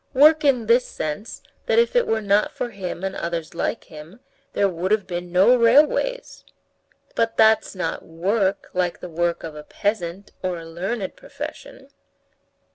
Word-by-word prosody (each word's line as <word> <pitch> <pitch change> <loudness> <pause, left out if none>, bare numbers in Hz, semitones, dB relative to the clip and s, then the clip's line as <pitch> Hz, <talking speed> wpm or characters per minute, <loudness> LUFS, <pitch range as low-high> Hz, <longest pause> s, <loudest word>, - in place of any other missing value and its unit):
Work 305 +3 +6
in 255 -5 +3
this 235 +3 +3
sense, 155 +9 -5 0.2
that 480 -2 +2
if 470 +1 +3
it 485 - +3
were 220 -1 0
not 200 +1 +2
for 245 - -4
him 190 -3 -6
and 195 0 -2
others 170 -1 -4
like 170 - -2
him, 155 +7 -12 0.3
there 200 - +3
would 180 0 -3
have 210 -2 +2
been 175 -1 -5
no 190 +8 +6
railways." 295 - +2 0.7
"But 230 -1 0
that's 220 -2 +4
not 170 -3 -3
work, 190 +4 -1
like 180 -1 -1
the 180 - -8
work 170 +1 -1
of 160 - -6
a 150 - -8
peasant 195 +2 -3
or 185 -2 -2
a 165 - -9
learned 190 +5 -4
profession." 270 +1 -9
195 Hz, 165 wpm, -23 LUFS, 175-230 Hz, 0.7 s, Work